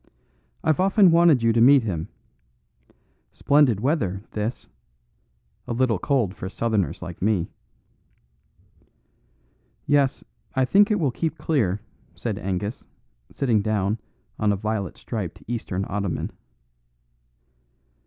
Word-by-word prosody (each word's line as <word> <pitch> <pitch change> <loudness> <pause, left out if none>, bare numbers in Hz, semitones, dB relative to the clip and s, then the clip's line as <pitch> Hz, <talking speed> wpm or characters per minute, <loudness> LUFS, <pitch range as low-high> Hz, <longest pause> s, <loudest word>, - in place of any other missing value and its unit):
"I've 155 +1 +2
often 195 0 +5
wanted 165 -7 +5
you 115 0 +4
to 115 - +3
meet 135 +1 +7
him. 85 -7 -3 1.3
Splendid 140 -8 +3
weather, 105 - 0
this; 110 +3 -4 1.0
a - - -2
little 115 -4 +1
cold 125 -10 0
for 95 - -6
Southerners 110 -3 -1
like 85 0 -8
me." 100 -4 0 2.3
"Yes, 140 -2 +2 0.3
I 130 -1 +3
think 200 +9 +4
it 210 -2 +1
will 145 -6 +1
keep 160 +3 -3
clear," 105 - 0 0.3
said - - -3
Angus, 95 +4 -3 0.5
sitting 120 -7 +1
down 105 0 0 0.4
on 105 -1 +2
a - - +1
violet 105 -2 -3
striped 105 -8 -5
Eastern 105 -5 -3
ottoman. 100 -4 -3
115 Hz, 115 wpm, -24 LUFS, 100-140 Hz, 2.3 s, meet